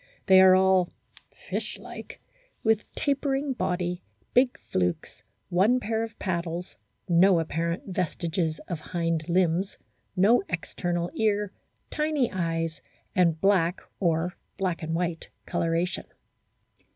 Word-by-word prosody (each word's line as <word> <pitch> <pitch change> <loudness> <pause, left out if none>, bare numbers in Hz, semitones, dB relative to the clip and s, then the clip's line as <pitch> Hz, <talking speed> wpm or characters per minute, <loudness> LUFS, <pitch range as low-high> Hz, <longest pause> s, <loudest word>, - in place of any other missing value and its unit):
They 190 -1 +8
are 185 0 +8
all 190 -1 +4 0.3
" - - -24 0.2
fish - - -3
like," - - -10 0.4
with 220 -1 +1
tapering 275 0 0
body, 180 -5 -1 0.3
big 250 0 +4
flukes, 90 -1 -2 0.3
one 205 +8 +4
pair 225 -2 -1
of 225 -1 -5
paddles, 175 -1 -3 0.3
no 180 0 +5
apparent 165 +2 -2
vestiges 170 -3 -1
of 170 -4 -3
hind 165 -1 -2
limbs, 180 +1 +1 0.4
no 205 +6 +5
external 175 0 -2
ear, 210 -2 +1 0.4
tiny 300 -5 +1
eyes, 165 -3 -2 0.3
and 170 -3 +3
black 185 -2 +3 0.2
or 170 0 +1 0.2
black 185 -3 -1
and 160 0 -2
white 170 -1 -2 0.2
colouration. 170 +2 -1
180 Hz, 115 wpm, -27 LUFS, 165-200 Hz, 0.4 s, They